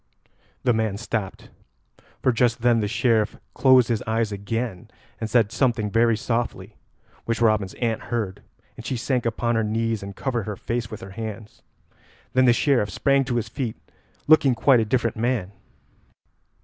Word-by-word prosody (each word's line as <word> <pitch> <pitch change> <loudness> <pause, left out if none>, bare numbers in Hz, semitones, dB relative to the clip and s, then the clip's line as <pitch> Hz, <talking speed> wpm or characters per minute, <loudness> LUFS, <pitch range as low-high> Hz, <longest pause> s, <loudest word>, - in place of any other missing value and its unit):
The 125 - +3
man 110 -3 -1
stopped, 110 -3 -4 0.7
for 130 - +4
just 120 0 +1
then 120 -1 +4
the 105 - 0
Sheriff 115 -1 +1 0.2
closed 130 -3 +5
his 115 -3 0
eyes 110 -1 0
again 100 0 -4 0.3
and 110 - -3
said 110 -4 +3
something 115 -4 0
very 115 0 +3
softly, 115 +1 -3 0.5
which 115 -1 -1
Robin's 110 -4 +2
aunt 115 -3 -2
heard, 110 -6 -3 0.3
and - - -10
she 130 - -3
sank 125 0 -1
upon 120 +1 -1
her 115 -1 +1
knees 115 0 -1
and 100 0 -8
covered 120 -4 -2
her 105 - -3
face 115 +2 -3
with 110 - -8
her 95 - -9
hands. 110 +1 -7 0.7
Then 130 0 +4
the 120 - +6
Sheriff 120 -4 +2
sprang 135 +8 +2
to 125 -2 -2
his 115 -2 -1
feet, 120 0 -4 0.5
looking 145 -4 +5
quite 130 +1 +4
a 110 - +1
different 115 -1 0
man. 115 -5 -1
115 Hz, 165 wpm, -24 LUFS, 110-120 Hz, 0.7 s, the